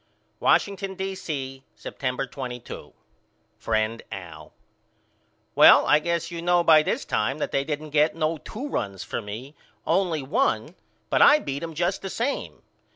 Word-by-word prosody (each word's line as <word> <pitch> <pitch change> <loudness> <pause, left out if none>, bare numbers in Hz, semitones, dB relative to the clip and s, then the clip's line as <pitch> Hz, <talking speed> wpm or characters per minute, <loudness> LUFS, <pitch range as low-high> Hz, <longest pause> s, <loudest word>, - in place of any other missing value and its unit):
Washington, 195 -1 +1
D. 190 +1 -3
C., 135 -7 -5
September 130 0 -4
22. 125 -3 -8 0.7
FRIEND 110 +1 -1
AL: 80 -6 -9 1.0
Well - - +8
I 150 - +5
guess 170 +1 -2
you 170 -1 -5
know 175 0 +3
by 160 -2 +7
this - - -2
time 120 +7 -1
that - - -3
they 135 - +1
didn't 150 +1 -5
get 150 +1 +3
no 160 0 -1
two 255 - -7
runs 100 - -3
for - - -4
me, 110 +7 -8 0.3
only 170 -6 +1
one, 130 +1 0 0.4
but - - +3
I 295 - +8
beat 140 - -5
him 165 -1 -6
just 175 +4 -1
the 195 - -5
same. 245 +8 -3
150 Hz, 155 wpm, -25 LUFS, 125-175 Hz, 1.0 s, Well